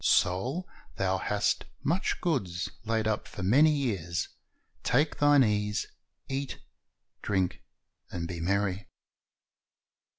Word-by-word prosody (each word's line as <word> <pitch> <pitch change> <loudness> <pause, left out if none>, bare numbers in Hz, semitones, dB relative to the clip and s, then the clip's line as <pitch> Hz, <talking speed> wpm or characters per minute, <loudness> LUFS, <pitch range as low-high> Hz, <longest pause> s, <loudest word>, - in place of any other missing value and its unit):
Soul, 125 - +2 0.3
thou 95 -1 +1
hast 105 +1 0 0.2
much 175 +6 0
goods 95 - -1
laid 110 0 +1
up 110 -1 -1
for 95 - -6
many 135 +12 +6
years; 100 - -1 0.5
take 145 +4 +2
thine 145 -2 +6
ease, 105 -2 +1 0.4
eat, 135 +1 -3 0.6
drink, 95 -3 0 0.5
and 85 -1 -4
be 85 -1 -5
merry." 100 +2 0
105 Hz, 105 wpm, -29 LUFS, 95-135 Hz, 0.6 s, many